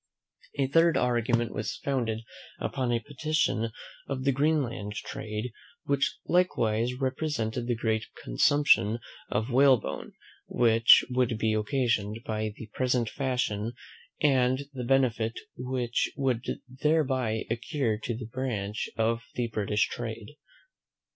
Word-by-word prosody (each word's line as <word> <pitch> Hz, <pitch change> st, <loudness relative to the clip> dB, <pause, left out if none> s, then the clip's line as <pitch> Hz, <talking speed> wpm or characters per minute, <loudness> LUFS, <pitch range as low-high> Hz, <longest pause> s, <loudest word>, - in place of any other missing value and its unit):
A 140 Hz, -, +2 dB
third 165 Hz, +4 st, +4 dB
argument 120 Hz, -1 st, +1 dB
was 110 Hz, +4 st, -3 dB
founded 120 Hz, -5 st, -1 dB, 0.4 s
upon 130 Hz, -3 st, -1 dB
a 120 Hz, -, +2 dB
petition 145 Hz, -5 st, 0 dB, 0.4 s
of 130 Hz, -2 st, -3 dB
the 135 Hz, -, +3 dB
Greenland 135 Hz, -7 st, 0 dB
trade, 110 Hz, +3 st, -5 dB, 0.3 s
which 140 Hz, 0 st, 0 dB
likewise 120 Hz, -10 st, +2 dB
represented 130 Hz, -4 st, -1 dB
the 120 Hz, -, +1 dB
great 110 Hz, -1 st, 0 dB, 0.2 s
consumption 115 Hz, -, +3 dB, 0.3 s
of 110 Hz, +4 st, -1 dB
whalebone 130 Hz, -3 st, +3 dB, 0.3 s
which 115 Hz, -1 st, +6 dB
would 125 Hz, -3 st, +1 dB
be 110 Hz, 0 st, +1 dB
occasioned 110 Hz, -2 st, 0 dB
by 110 Hz, -1 st, -2 dB
the 110 Hz, -, -8 dB
present 125 Hz, -3 st, +1 dB
fashion, 120 Hz, -5 st, -1 dB, 0.5 s
and 130 Hz, -2 st, +3 dB
the 125 Hz, -2 st, -4 dB
benefit 120 Hz, -3 st, +1 dB, 0.2 s
which 125 Hz, -1 st, -1 dB
would 130 Hz, -4 st, 0 dB, 0.2 s
thereby 130 Hz, -5 st, 0 dB
accrue 120 Hz, -2 st, -1 dB
to 115 Hz, -1 st, -3 dB
that 115 Hz, -2 st, -8 dB
branch 110 Hz, -6 st, -3 dB
of 115 Hz, +1 st, +1 dB
the 120 Hz, -1 st, -1 dB
British 105 Hz, -1 st, +1 dB
trade. 115 Hz, +2 st, -6 dB
120 Hz, 120 wpm, -28 LUFS, 110-135 Hz, 0.5 s, which